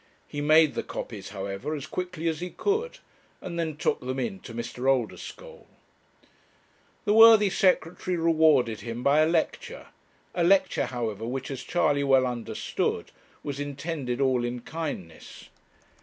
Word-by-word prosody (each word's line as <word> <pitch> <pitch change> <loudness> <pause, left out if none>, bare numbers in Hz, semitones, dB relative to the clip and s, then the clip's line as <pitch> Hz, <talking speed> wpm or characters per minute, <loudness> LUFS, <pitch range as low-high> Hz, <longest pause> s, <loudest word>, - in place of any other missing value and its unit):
He 145 - -5
made 155 +1 +5
the - - -2
copies, 105 -4 -7
however, 100 +8 -4
as 140 - -6
quickly 180 -2 -4
as 160 -2 -1
he 180 +1 -4
could, 440 - -1 0.4
and 170 -2 -6
then 160 -3 -2
took - - 0
them 130 +1 -4
in 195 - -3
to 125 - -11
Mr. 120 +3 -2
Oldeschole. 135 - -3 1.4
The 205 - +3
worthy 220 -2 +8
Secretary 180 -1 +1
rewarded 155 -8 +3
him 120 +1 -6
by 140 +2 +4
a 155 - +5
lecture; 165 -1 -2 0.4
a 175 - 0
lecture, 190 +3 +3
however, 115 -3 -4
which, 130 +2 -4
as 135 -2 -5
Charley 145 -4 +1
well 135 -2 +4
understood, 120 -2 -3 0.3
was 140 -1 -5
intended 145 -3 -4
all 130 -3 +2
in 120 0 -3
kindness. 140 - -7
145 Hz, 145 wpm, -27 LUFS, 125-170 Hz, 1.4 s, worthy